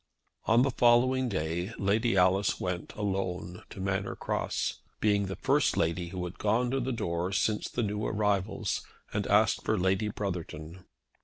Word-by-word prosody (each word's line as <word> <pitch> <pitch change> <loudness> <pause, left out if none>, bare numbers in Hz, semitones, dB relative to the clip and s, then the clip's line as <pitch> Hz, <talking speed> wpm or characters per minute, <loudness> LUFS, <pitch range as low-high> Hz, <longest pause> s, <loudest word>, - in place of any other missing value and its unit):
On 115 +2 +5
the 135 - +1
following 125 +2 +4
day 85 +3 -2
Lady 105 +2 +1
Alice 95 +2 +3
went 90 -1 -3
alone 95 -3 -3
to - - -10
Manor 95 0 -1
Cross, - - -2 0.2
being 100 -2 +2
the 95 - -4
first - - +2
lady 85 +2 0
who 90 +1 -5
had 90 - -8
gone 115 +4 +1
to 135 - +1
the 130 +1 -2
door 85 -5 -2
since 105 +2 0
the 120 - -1
new 105 0 -2
arrivals, 105 -1 0 0.3
and 105 -1 -1
asked 105 +1 +3
for 110 - +1
Lady 95 +3 +1
Brotherton. 90 -4 -5
100 Hz, 160 wpm, -29 LUFS, 90-110 Hz, 0.3 s, On